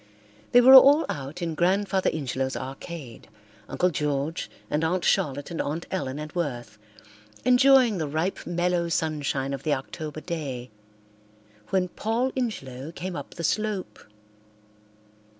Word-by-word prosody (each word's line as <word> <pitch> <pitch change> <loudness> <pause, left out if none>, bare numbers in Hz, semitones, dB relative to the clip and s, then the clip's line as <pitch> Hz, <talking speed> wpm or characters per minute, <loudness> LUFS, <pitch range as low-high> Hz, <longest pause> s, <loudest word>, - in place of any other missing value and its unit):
They 245 - +7
were 260 +2 +8
all 280 +4 +9
out 145 +5 -5
in 165 -1 -2
Grandfather 190 +3 +1
Ingelow's 135 -3 -2
arcade, 135 -1 -8 0.4
Uncle 180 0 +1
George 150 +1 -2 0.2
and 150 +2 -1
Aunt 175 +3 0
Charlotte 145 +2 0
and 165 - -2
Aunt 155 +4 -3
Ellen 140 -8 -3
and 150 0 -7
Worth, 120 -11 -4 0.7
enjoying 255 -4 +5
the 155 - -1
ripe 160 +6 -2
mellow 175 0 0
sunshine 145 -4 -1
of 135 - -4
the 150 0 +1
October 155 +3 -7
day, 140 -8 -5 1.0
when 185 -1 +1
Paul 225 +8 -1
Ingelow 150 - -4
came 185 0 -5
up - - -8
the 170 - -6
slope. 210 +2 -2
165 Hz, 135 wpm, -26 LUFS, 140-190 Hz, 1.0 s, all